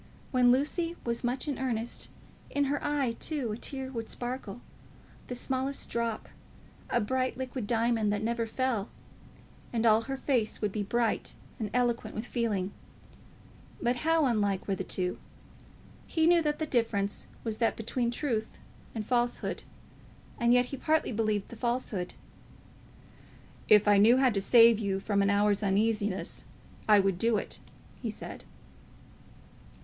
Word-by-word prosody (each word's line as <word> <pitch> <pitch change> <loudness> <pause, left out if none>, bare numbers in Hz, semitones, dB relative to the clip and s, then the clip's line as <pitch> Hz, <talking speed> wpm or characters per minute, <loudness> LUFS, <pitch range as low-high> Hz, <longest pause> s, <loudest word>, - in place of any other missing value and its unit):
When 250 -2 +5
Lucy 330 +6 +1
was 235 +1 -1
much 250 +4 -1
in 285 - -2
earnest, 235 -3 -2 0.4
in 285 - +1
her 290 - -2
eye, 285 -4 +1
too, 280 -8 -2
a 210 - -3
tear 265 +1 -5
would 230 -3 -5
sparkle, 240 -3 -5 0.7
the 250 - -4
smallest 265 +2 -2
drop, 235 -1 -2 0.6
a 240 - +2
bright 255 +4 -1
liquid 255 -4 -4
diamond 225 -2 +2
that 205 +1 -1
never 230 0 -1
fell; 235 -3 -1 0.8
and 230 -1 0
all 220 0 +6
her 270 +3 -4
face 245 -6 0
would 210 -2 -1
be 210 - -2
bright 230 +2 0 0.2
and 215 -2 -2
eloquent 240 -2 0
with 220 - -3
feeling; 210 -6 -1 1.1
but 245 +1 +1
how 325 +2 +2
unlike 205 -6 0
were 195 - +1
the - - -3
two! 180 -1 -2 0.9
He 320 -1 +1
knew 340 0 +5
that 300 -1 0
the 315 - -1
difference 225 -7 0 0.2
was 220 -2 -1
that 230 - +2
between 235 +2 -1
truth 235 -3 -2 0.4
and 215 -2 -3
falsehood; 240 +1 0 0.8
and 235 0 +3
yet 245 0 +5
he 275 - -6
partly 315 +1 +1
believed 215 -3 0
the - - -9
falsehood! 235 -6 -2 1.5
"If 210 0 +7
I 205 -1 +6
knew 230 +5 +7
how 260 -1 +4
to 200 -2 0
save 230 +1 +7
you 195 -3 -1
from 200 0 +1
an 200 - +3
hour's 205 0 +3
uneasiness, 205 0 0 0.5
I 210 -1 +8
would 195 -2 +1
do 230 0 +3
it," - - -5 0.4
he - - -2
said. - - -7
235 Hz, 155 wpm, -30 LUFS, 210-255 Hz, 1.5 s, I